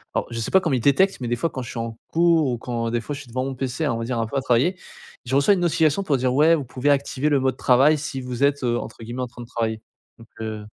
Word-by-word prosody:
alors - - 0
je 115 - -4
sais 110 - -3
pas 190 - +5
comment 165 -6 0
ils - - 0
détectent, 145 - +3
mais, 120 - -3
des 120 - 0
fois, 165 +8 -1
quand 130 - -6
je 120 - -7
suis - - -6
en 115 -1 -5
cours 165 -2 +3
ou 120 - -2
quand, 115 -1 -3
des 120 0 -1
fois, 145 - -5
je 140 - -6
suis 140 - -14
devant 130 +2 -3
mon 135 - -3
PC, 135 +4 -3
on 115 - -1
va 115 - -3
dire, 120 0 -2
un 115 - 0
peu 140 - -3
à - - +1
travailler, 130 +9 +2 0.5
je 130 +2 -1
reçois 140 +9 +5
une 195 - 0
notification 165 0 +2
pour 150 -7 +1
dire, 125 0 0
ouais: 155 +5 +5
«Vous 150 - -3
pouvez 130 +2 -2
activer 140 0 +1
le 145 -2 +3
mode 130 0 0
travail 135 +5 +4
si 145 -2 -5
vous 125 0 -4
êtes, 140 -1 0
heu, 120 -1 +1
entre - - -8
guillemets, 120 +3 -5
"en - - -3
train 120 0 -12
de 120 - -9
travailler"», 110 -2 -2 0.4
donc 115 - -15
heu 110 -1 -5
130 Hz, 310 wpm, -23 LUFS, 120-145 Hz, 0.5 s, pas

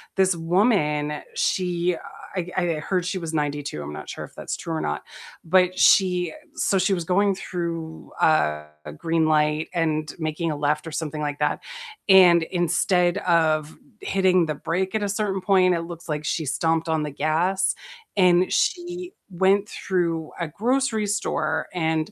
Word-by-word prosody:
this 190 -2 +3
woman, 165 -5 +1
she, 180 -1 0
uh - - -10 0.4
I - - +2
g 180 - -11
I 175 -2 +1
heard 180 +1 -1
she 185 +1 -2
was 165 -2 -5
92, 145 - -2
I'm 75 +1 -7
not - - -8
sure - - -6
if - - -19
that's - - -5
true 165 - -5
or 160 - -2
not, 75 - -3 0.4
but 185 +1 +3
she 180 -4 +4 0.2
so 195 - +1
she 190 +1 +2
was 175 -3 -2
going 195 +3 +2
through 170 -4 -5
a 75 - +3 0.3
green 165 -1 +1
light, 150 0 +1
and 155 -3 -1
making 160 +1 -2
a - - -3
left 150 +2 0
or 160 - -6
something 155 -1 -4
like 145 -1 -3
that, 150 - 0 0.5
and 180 -3 +7
instead 175 +1 +1
of 160 -4 +1 0.2
hitting 185 -2 +2
the 155 - -1
brake 185 +6 -2
at 215 - 0
a - - 0
certain 205 -2 -1
point, 185 -1 +4
it 165 - -2
looks 170 -1 -10
like 150 0 -3
she 155 +1 -1
stomped 160 +4 0
on 160 -1 +1
the 150 - -3
gas, 170 +7 +1 0.4
and 180 -1 +4
she 355 0 -1 0.2
went 195 +3 +2
through 170 -4 -2
a 170 - -2
grocery 225 - 0
store, 205 +2 -1
and, 160 +1 -1
170 Hz, 170 wpm, -24 LUFS, 155-185 Hz, 0.5 s, and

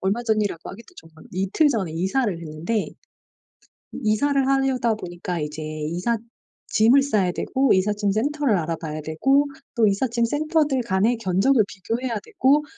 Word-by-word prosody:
얼마 200 +5 0
전이라고 215 -7 -1
하기도 230 - -13
좀 - - -13
그런데 160 - -17
이틀 205 - +2
전에 195 - -1
이사를 195 +8 0
했는데 170 +7 -3 1.2
이사를 270 +6 +2
하려다 270 -4 +2
보니까 175 -3 -5
이제 150 +1 -5
이삿짐을 215 - 0
싸야 205 -10 +1
되고 265 +7 +1
이삿짐 205 +2 +1
센터를 275 +2 +1
알아봐야 160 -1 -4
되고 270 - +2 0.3
또 225 -3 +4
이삿짐 235 +3 +1
센터들 295 0 +1
간의 210 +5 +2
견적을 220 +4 +3
비교해야 230 +3 -3
되고 295 - +2
220 Hz, 340 characters per minute, -23 LUFS, 185-265 Hz, 1.2 s, 또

